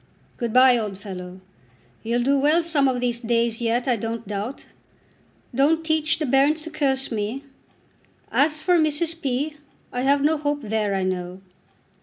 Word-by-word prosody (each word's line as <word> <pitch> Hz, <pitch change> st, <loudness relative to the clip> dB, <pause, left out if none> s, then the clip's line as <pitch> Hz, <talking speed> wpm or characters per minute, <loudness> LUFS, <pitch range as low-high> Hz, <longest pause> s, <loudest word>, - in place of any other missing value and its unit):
Good 235 Hz, -2 st, -2 dB
bye, 255 Hz, 0 st, +6 dB
old 210 Hz, -3 st, -4 dB
fellow. 185 Hz, -2 st, -9 dB, 0.6 s
You'll 235 Hz, +2 st, -1 dB
do 275 Hz, +3 st, +3 dB
well 305 Hz, +5 st, +3 dB
some 305 Hz, -5 st, +3 dB
of 255 Hz, -1 st, 0 dB
these 240 Hz, -1 st, -1 dB
days 235 Hz, -1 st, 0 dB
yet, 235 Hz, +2 st, 0 dB
I 245 Hz, -2 st, +2 dB
don't 225 Hz, 0 st, -5 dB
doubt. 210 Hz, +6 st, -5 dB, 0.9 s
Don't 310 Hz, +6 st, +2 dB
teach 315 Hz, -1 st, +1 dB
the 315 Hz, -, -2 dB
bairns 280 Hz, +4 st, +2 dB
to 325 Hz, -, -8 dB
curse 275 Hz, -4 st, -1 dB
me. 225 Hz, +5 st, -3 dB, 0.9 s
As 305 Hz, +1 st, +2 dB
for 355 Hz, 0 st, +3 dB
Mrs. 320 Hz, +2 st, 0 dB
P. 285 Hz, +3 st, -2 dB, 0.4 s
I 245 Hz, -, -2 dB
have 280 Hz, +2 st, +2 dB
no 310 Hz, +1 st, +2 dB
hope 290 Hz, 0 st, -1 dB
there, 210 Hz, -2 st, -1 dB
I 190 Hz, -, -1 dB
know." 180 Hz, 0 st, -3 dB
255 Hz, 165 wpm, -23 LUFS, 225-300 Hz, 0.9 s, bye